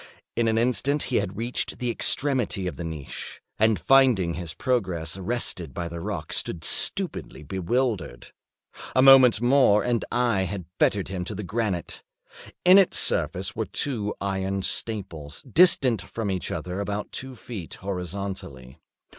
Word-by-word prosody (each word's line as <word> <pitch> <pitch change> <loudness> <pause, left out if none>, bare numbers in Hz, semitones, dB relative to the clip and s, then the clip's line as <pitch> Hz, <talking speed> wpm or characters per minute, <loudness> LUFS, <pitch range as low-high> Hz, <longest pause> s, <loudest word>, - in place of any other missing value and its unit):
In 115 -1 +1
an 110 0 +1
instant 125 +5 +1
he - - -1
had 95 +3 -2
reached 120 +2 -3
the 125 -1 -2
extremity 125 -6 +2
of 90 -5 -3
the 85 - -6
niche, 80 -4 -7 0.2
and 110 -1 +3
finding 125 -11 +4
his 85 -3 -6
progress 95 -11 -1
arrested 95 - -3
by 85 -1 -3
the 85 0 -7
rock, - - -5
stood 85 -2 0
stupidly 185 - 0
bewildered. 95 - -2 0.6
A 130 - +5
moment 130 -5 +8
more 120 -5 +4
and 120 -2 0
I 120 -6 +1
had 95 -1 -5
fettered 100 -3 +1
him 95 -2 -3
to 105 - -5
the 105 - -5
granite. 105 -3 -3 0.6
In 185 +2 +8
its 195 - +3
surface - - +1
were - - -2
two 110 -7 -3
iron 95 0 -2
staples, 85 -11 -4
distant 130 - +4
from 100 +2 -4
each 90 -4 -3
other 90 +2 -4
about 100 +1 -4
two 130 0 -6
feet, 110 -8 -8
horizontally. 90 -9 -6
100 Hz, 150 wpm, -25 LUFS, 90-125 Hz, 0.6 s, moment